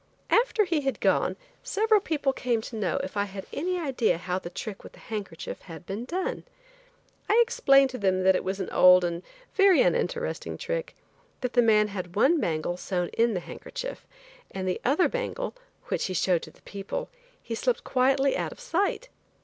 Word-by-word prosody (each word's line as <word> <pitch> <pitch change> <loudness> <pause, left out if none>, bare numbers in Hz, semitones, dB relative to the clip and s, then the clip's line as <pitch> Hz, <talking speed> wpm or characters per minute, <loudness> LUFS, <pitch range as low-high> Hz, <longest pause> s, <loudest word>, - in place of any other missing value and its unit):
After 460 -2 +4
he 335 -4 0
had 270 -1 -2
gone, - - +2 0.3
several 435 +1 +2
people 290 -6 0
came 245 -3 0
to 225 - -8
know 215 -3 -1
if 190 - -6
I 200 0 +1
had 195 -1 -8
any 360 +4 -1
idea 255 - +1
how 180 +1 -2
the 170 - -7
trick 195 +3 -7
with - - -12
the - - -16
handkerchief 200 -7 -6
had 165 -1 -11
been 205 +6 -5
done. 375 - -3 0.9
I 440 - +5
explained 275 - +4
to 255 - -6
them 190 -2 +1
that 190 0 +5
it - - -1
was 190 +1 -3
an 190 - -4
old 180 0 +7
and 170 0 -2 0.3
very 390 -2 +6
uninteresting 480 0 -1
trick; - - -4 0.5
that 250 -1 -2
the 245 - +5
man 215 -2 +4
had 185 -3 -6
one 305 +10 +4
bangle 165 - -1
sewn 180 -1 -2
in 230 -2 +1
the 180 - -2
handkerchief, - - -7 0.4
and 190 -1 -4
the 185 - -1
other 290 +8 +3
bangle, - - -3 0.4
which - - 0
he 185 - -3
showed 175 0 +2
to - - -9
the - - -23
people, 200 - -5 0.3
he 230 - -5
slipped 475 - 0
quietly 270 +1 +2
out - - -2
of - - -12
sight. 455 +1 -1
235 Hz, 190 wpm, -27 LUFS, -, 0.9 s, old